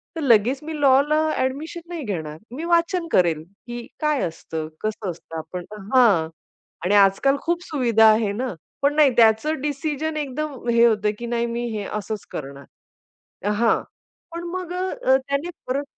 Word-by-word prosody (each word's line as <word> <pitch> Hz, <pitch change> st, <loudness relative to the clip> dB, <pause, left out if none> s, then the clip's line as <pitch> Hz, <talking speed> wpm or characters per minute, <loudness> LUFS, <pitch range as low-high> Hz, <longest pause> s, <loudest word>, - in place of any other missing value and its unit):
तर 325 Hz, -, -3 dB
लगेच 245 Hz, 0 st, +4 dB
मी 310 Hz, -1 st, -5 dB
लॉला 280 Hz, +3 st, +4 dB, 0.2 s
ॲडमिशन 290 Hz, +6 st, -2 dB
नाही 335 Hz, -4 st, -5 dB
घेणार. 160 Hz, -8 st, -4 dB, 0.2 s
मी 310 Hz, -, -5 dB
वाचन 340 Hz, 0 st, +1 dB
करेल, 165 Hz, -4 st, +2 dB, 0.2 s
की 240 Hz, 0 st, -6 dB, 0.2 s
काय 300 Hz, -2 st, +1 dB
असतं, 160 Hz, -1 st, -4 dB
कसं 215 Hz, -2 st, -3 dB
असतं. 165 Hz, -1 st, -10 dB
आपण 175 Hz, +3 st, -6 dB, 0.3 s
हां 200 Hz, -11 st, +5 dB, 0.6 s
आणि 200 Hz, +3 st, +3 dB
आजकाल 200 Hz, +8 st, +4 dB
खूप 345 Hz, +1 st, -1 dB
सुविधा 240 Hz, -, +3 dB
आहे 215 Hz, -2 st, +1 dB
ना. 245 Hz, +1 st, -3 dB, 0.3 s
पण 285 Hz, +1 st, +2 dB
नाही 300 Hz, -3 st, +6 dB
त्याचं 230 Hz, +7 st, +4 dB
डिसिजन 300 Hz, +2 st, -2 dB
एकदम 285 Hz, -2 st, -4 dB
हे 235 Hz, 0 st, +5 dB
होतं, 210 Hz, -2 st, +2 dB
की 240 Hz, -, -5 dB
"नाही, 235 Hz, 0 st, 0 dB
मी 235 Hz, +1 st, -3 dB
हे 205 Hz, -, -3 dB
असंच 210 Hz, 0 st, -4 dB
करणार." 140 Hz, -1 st, -7 dB, 0.9 s
हां 230 Hz, +1 st, +2 dB, 0.5 s
पण 340 Hz, -, -5 dB
मग 365 Hz, -1 st, -4 dB
अ, 360 Hz, -8 st, +1 dB
त्याने 280 Hz, +5 st, -1 dB, 0.2 s
परत 275 Hz, +3 st, -1 dB
250 Hz, 160 wpm, -23 LUFS, 210-300 Hz, 0.9 s, नाही